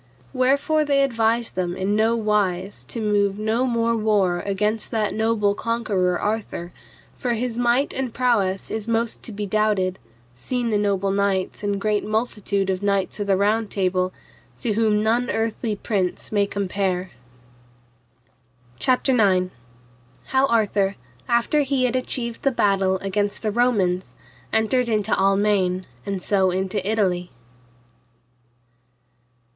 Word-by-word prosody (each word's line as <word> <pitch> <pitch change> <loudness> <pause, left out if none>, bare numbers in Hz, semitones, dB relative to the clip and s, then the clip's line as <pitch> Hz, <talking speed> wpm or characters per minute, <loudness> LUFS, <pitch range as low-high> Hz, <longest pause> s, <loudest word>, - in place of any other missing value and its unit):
Wherefore 280 +5 +2
they 280 -2 +3
advised 230 -2 +1
them 180 -1 -2
in 195 +2 0
no 220 +2 +3
wise 200 - 0
to 230 - -4
move 205 -2 +1
no 220 +4 0
more 230 -1 +1
war 205 -5 +2
against 210 +3 -1
that 220 -3 -1
noble 220 -2 +1
conqueror 205 -6 0
Arthur, 205 -5 -3 0.4
for 245 -3 -1
his 235 0 -2
might 245 +3 +1
and 260 -2 -2
prowess 215 -7 0
is 220 0 -3
most 230 0 -1
to - - -9
be 205 0 -4
doubted, 200 -3 +1 0.3
seen 235 - -2
the 210 - +2
noble 200 -1 0
kings 200 -2 0
and 200 -1 -1
great 210 0 0
multitude 210 -3 -1
of 185 0 -3
knights 200 0 0
of 205 - -2
the 195 -1 +3
Round 210 +2 +1
Table, 185 -1 0 0.5
to 230 -4 0
whom 215 -1 +2
none 235 +3 +1
earthly 225 0 -1
prince 195 -3 -2
may 205 -1 +2
compare. 190 -2 -2 1.7
CHAPTER 255 - +2
IX. 185 -6 +3 0.8
How 265 +1 +3
Arthur, 205 -4 +1 0.3
after 235 +6 +2
he 275 -2 0
had 250 0 +1
achieved 240 -2 -2
the 275 - +3
battle 195 -6 +2
against 205 +2 -1
the 215 - 0
Romans, 200 -6 +1 0.4
entered 235 +3 +1
into 215 -1 0
Almaine, 195 -2 +2 0.2
and 195 -2 -3
so 190 -2 +2
into 190 +2 -1
Italy. 185 -5 0
210 Hz, 135 wpm, -23 LUFS, 195-230 Hz, 1.7 s, they